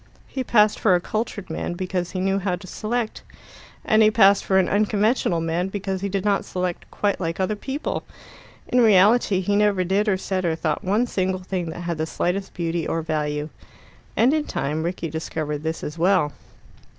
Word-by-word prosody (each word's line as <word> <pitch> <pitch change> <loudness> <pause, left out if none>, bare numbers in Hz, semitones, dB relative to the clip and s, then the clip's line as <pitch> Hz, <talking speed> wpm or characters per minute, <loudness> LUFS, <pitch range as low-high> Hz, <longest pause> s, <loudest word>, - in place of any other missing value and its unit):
He 260 - -3
passed 215 -3 +3
for 190 -5 +4
a - - +2
cultured 205 -2 -4
man 160 - -3
because 180 -1 -2
he 185 - -4
knew 195 +1 +1
how 185 -2 -1
to 180 - -11
select, 220 +4 -3 0.6
and 215 0 +4
he 215 - +7
passed 200 -2 +5
for 190 - +2
an 185 -2 +3
unconventional 210 -2 +1
man 165 +3 -1
because 195 -1 -3
he 200 - -2
did 195 0 -2
not 200 -1 +2
select 180 -1 -4
quite 205 -1 -1
like 165 -1 -3
other 190 +3 0
people. 270 +7 -3 0.7
In 250 - +3
reality 205 -1 +5
he 200 +2 0
never 205 -2 +3
did 200 +4 +1
or 190 - +2
said 185 0 -2
or 165 -2 +1
thought 160 -2 -2
one 210 +6 +2
single 185 -4 -1
thing 180 -2 -3
that 165 - -6
had 170 -2 -3
the 160 - -1
slightest 190 +4 -2
beauty 170 -1 -2
or 165 0 -1
value. 150 -1 -2 0.7
And 250 +5 +4
in 310 -1 0
time 150 +3 -2
Rickie 170 -1 -3
discovered 155 -1 -3
this 160 +2 -4
as 150 +2 -6
well. 180 -4 +3
185 Hz, 195 wpm, -23 LUFS, 170-205 Hz, 0.7 s, he